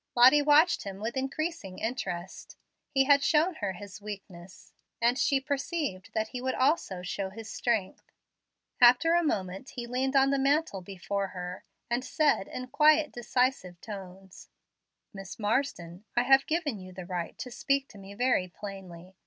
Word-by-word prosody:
Lottie 255 +5 +7
watched 300 +4 +5
him 195 -1 -7
with 225 +4 -4
increasing 270 - -3
interest. 190 -7 -5 0.3
He 270 -2 +3
had 280 +1 +5
shown 325 +4 +3
her 200 -2 -1
his 200 +2 -10
weakness, 190 -3 -10 0.3
and 235 +1 +3
she 275 +1 +2
perceived 280 - -3
that 220 0 0
he 250 - -6
would 260 0 -1
also 255 - +1
show 190 +2 -3
his 220 +3 -9
strength. 220 -6 -2 0.7
After 250 +7 +6
a 345 - +4
moment 195 - -3
he 240 -2 -4
leaned 260 +3 -1
on 270 0 +5
the 275 - +1
mantel 275 -7 +1
before 195 +1 -3
her, 180 -1 -7 0.2
and 240 +1 -1
said 290 -6 +1
in 255 - -6
quiet, 300 +2 +4
decisive 240 -7 -1
tones: 190 -2 -10 0.6
"Miss 195 -2 -8
Marsden, 205 -6 -2
I 240 - +5
have 270 +2 +5
given 310 - -1
you 185 0 -10
the 185 0 -8
right 175 -2 -4
to 250 - -7
speak 275 +2 0
to 210 - -13
me 195 +1 -11
very 245 -5 +1
plainly. 185 -2 -10
235 Hz, 160 wpm, -29 LUFS, 190-275 Hz, 0.7 s, Lottie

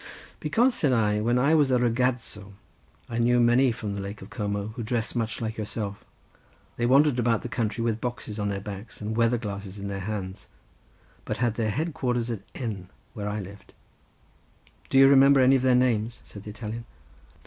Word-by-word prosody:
"Because," 235 - +2
said 145 - +1
I, 105 -3 +2
"when 120 +3 +2
I 140 +5 +3
was 150 -4 +4
a 130 - +3
ragazzo 120 -4 -1 0.5
I 115 0 -3
knew 120 +1 +3
many 120 +2 +4
from 110 -2 -5
the 100 - -4
Lake 100 +1 -7
of 95 - -13
Como, 105 -2 -3
who 115 +2 -7
dressed 115 +1 -2
much 115 -3 -2
like 110 -1 -3
yourself. 105 -1 -4 0.7
They 120 - 0
wandered 135 0 +4
about 115 -2 +1
the 120 - -5
country 115 -1 -2
with 115 -1 -1
boxes 115 -3 -5
on 105 0 -1
their 100 -1 -2
backs 100 +2 -8
and 110 +1 -4
weather 115 +1 +3
glasses 100 -3 -6
in 100 0 -5
their 100 0 -4
hands, 95 -1 -5 0.8
but - - -3
had 120 -1 +1
their 110 -1 -1
head 160 +8 -2
quarters 125 -3 -1
at 110 - -4
N. 100 -8 -5 0.2
where 105 -1 -4
I 105 +1 -3
lived." 100 +1 -12 1.2
"Do - - +2
you 135 0 +8
remember 140 0 +6
any 130 +1 +6
of 130 - +2
their 130 -1 +4
names?" 115 -2 +1
said 100 -1 -12
the - - -6
Italian. 110 +1 -6
115 Hz, 195 wpm, -26 LUFS, 105-125 Hz, 1.2 s, you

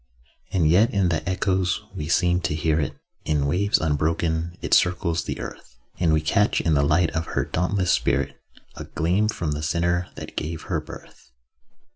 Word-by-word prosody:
And 85 -5 +2
yet 100 +9 +5
in 100 -3 +2
the 85 +1 -1
echoes 95 -1 0
we 75 - -5
seem 90 +2 +2
to 75 - -1
hear 80 0 +1
it; 75 - -3 0.3
In 75 -2 0
waves 100 +8 +2
unbroken 80 +2 -1
it - - -2
circles 90 -2 +2
the - - -4
earth: - - -9 0.2
And 85 -3 +3
we 80 -1 +3
catch 100 +7 +2
in 80 - +1
the 70 - +3
light 75 +4 +2
of 80 0 -3
her - - -1
dauntless 90 +1 0
spirit 70 -1 0 0.3
A - - -7
gleam 90 +6 0
from 85 -7 -2
the 75 +1 -3
centre 85 +3 0
that - - -9
gave 80 +1 -4
her - - -2
birth. 60 - -13
85 Hz, 180 wpm, -24 LUFS, 75-90 Hz, 0.3 s, yet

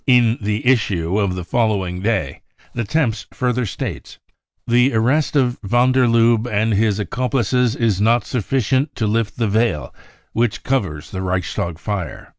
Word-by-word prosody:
In 120 -2 +4
the 105 +2 -2
issue 100 -7 +1
of 100 -3 0
the 90 - -4
following 95 -4 -1
day, 100 -10 -1 0.3
the 120 - -2
Temps 115 -4 -1
further 125 -3 -1
states: - - -6 0.3
" - - -70 0.2
The 120 +1 +3
arrest 135 +8 +1
of 125 -3 +1
van 120 +5 +2
der 130 -1 +3
Lubbe 115 0 +3
and 110 +2 +1
his 105 0 +2
accomplices 125 +3 0
is 110 -6 0
not 115 +3 +3
sufficient 130 +4 -1
to 110 - -1
lift 110 0 -1
the 115 -2 +1
veil 105 -7 0 0.4
which 115 -2 0
covers 80 - -2
the 95 - -4
Reichstag 90 -2 -2
fire." 100 -2 -5
115 Hz, 160 wpm, -19 LUFS, 100-125 Hz, 0.4 s, In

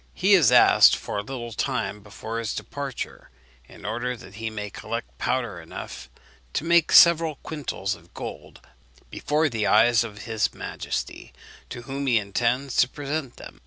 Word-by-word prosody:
He 195 +2 +3
has 155 - +6
asked 125 - +7
for 105 - -4
a - - -1
little 120 0 -7
time 105 -5 -2
before 110 +2 -6
his 115 -2 -3
departure, 140 -3 -6 0.4
in - - -14
order 120 +4 -3
that 95 -5 -13
he 115 - -2
may 105 -2 -6
collect 115 +2 -6
powder 115 -9 -2
enough 65 -6 -9 0.4
to - - -1
make 170 -1 +3
several 165 -2 +7
quintals 135 -10 -3
of 85 -1 -14
gold - - -8 0.5
before 155 +2 0
the 110 -6 -1
eyes 115 +1 +5
of 105 -3 -8
his 110 -3 -1
majesty, - - -5 0.4
to 120 - -7
whom 140 +2 -4
he 120 -3 +4
intends 120 +6 -1
to 125 - +4
present 145 -2 -4
them. - - -12
120 Hz, 160 wpm, -25 LUFS, 105-140 Hz, 0.5 s, asked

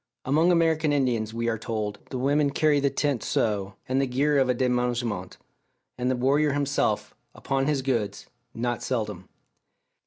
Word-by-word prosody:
Among 160 +6 +3
American 160 -3 +2
Indians, 125 -6 +1
we 115 +1 -2
are 115 -2 0
told, 110 -2 -3
the 130 - -4
women 140 +3 +2
carry 145 +1 +2
the 140 0 +2
tent 140 -3 -1
so, 100 -3 -1
and 130 +1 +1
the 135 - 0
gear 140 +3 +2
of 130 -1 +2
a 125 - +2
demenagement, 120 -6 -1 0.6
and 125 0 -1
the 130 - +1
warrior 140 +4 +2
himself, 145 0 0 0.2
upon 135 0 -1
his 145 -3 0
goods, 115 -7 -1 0.3
not 120 +1 -2
seldom. 105 -7 -3
130 Hz, 160 wpm, -26 LUFS, 115-145 Hz, 0.6 s, Among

